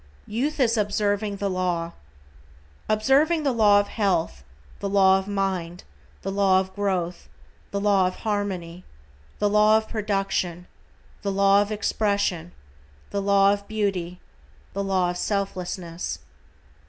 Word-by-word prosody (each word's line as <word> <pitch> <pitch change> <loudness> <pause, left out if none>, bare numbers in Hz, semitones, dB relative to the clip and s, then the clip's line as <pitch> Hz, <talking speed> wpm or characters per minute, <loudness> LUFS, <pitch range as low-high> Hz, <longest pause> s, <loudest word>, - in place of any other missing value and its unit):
=YOUTH 275 +8 -2
IS 235 -3 +3
OBSERVING 205 0 0
THE 200 0 -2
LAW:= 180 -3 -1 1.0
Observing 275 +9 +3
the 280 - +2
law 210 -4 +5
of 205 - -1
health, 195 -6 -1 0.4
the 200 - -3
law 190 -1 +5
of 190 - -8
mind, 190 -4 -2 0.4
the - - -3
law 195 -1 +3
of 190 0 -4
growth, 185 -3 -2 0.4
the 200 - -2
law 200 -2 +3
of 185 - -4
harmony, 185 -5 -3 0.5
the 205 - +1
law 210 +1 +5
of 220 0 -3
production, 195 -5 -2 0.6
the 200 - -2
law 200 +1 +4
of 205 +1 -2
expression, 200 -5 -1 0.6
the 200 - -1
law 200 0 +4
of 200 0 -6
beauty, 195 -5 -2 0.5
the 200 - -2
law 185 -2 +1
of 175 - -6
selflessness. 180 - -3
200 Hz, 135 wpm, -24 LUFS, 185-210 Hz, 1.0 s, law